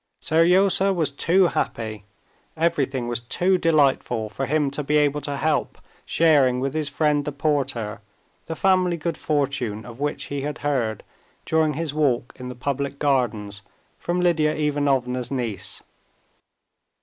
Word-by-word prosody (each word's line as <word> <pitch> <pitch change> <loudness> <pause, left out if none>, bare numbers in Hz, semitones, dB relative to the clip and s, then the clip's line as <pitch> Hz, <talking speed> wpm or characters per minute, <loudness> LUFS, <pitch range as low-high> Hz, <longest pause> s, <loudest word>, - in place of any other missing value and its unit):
Seryozha 185 +4 +3
was 165 -6 +1
too 175 +7 +3
happy, 110 -7 -3 0.5
everything 135 -6 0
was 120 -1 -2
too 180 +10 +1
delightful 135 -8 +2
for 135 +4 -3
him 150 0 +1
to 140 - -3
be 150 +1 +1
able 150 0 +2
to 145 -1 -4
help 155 +2 0 0.3
sharing 140 -6 +4
with 135 +1 -2
his 155 -2 -1
friend 150 -2 +1
the 150 - -3
porter 135 -7 -1 0.5
the 160 - -4
family 185 -1 +2
good 165 +1 -2
fortune 135 -9 -1
of 120 0 -11
which 145 0 -2
he 140 -1 -4
had 145 +1 -4
heard 120 -7 0 0.4
during 160 -2 +1
his 160 -1 -3
walk 135 -5 0
in 125 0 -6
the 125 - -7
public 140 +2 -3
gardens 115 -8 0 0.4
from 175 +1 -1
Lidia 165 -4 +2
Ivanovna's 135 -5 0
niece. 115 -8 -3
145 Hz, 145 wpm, -23 LUFS, 125-155 Hz, 0.5 s, sharing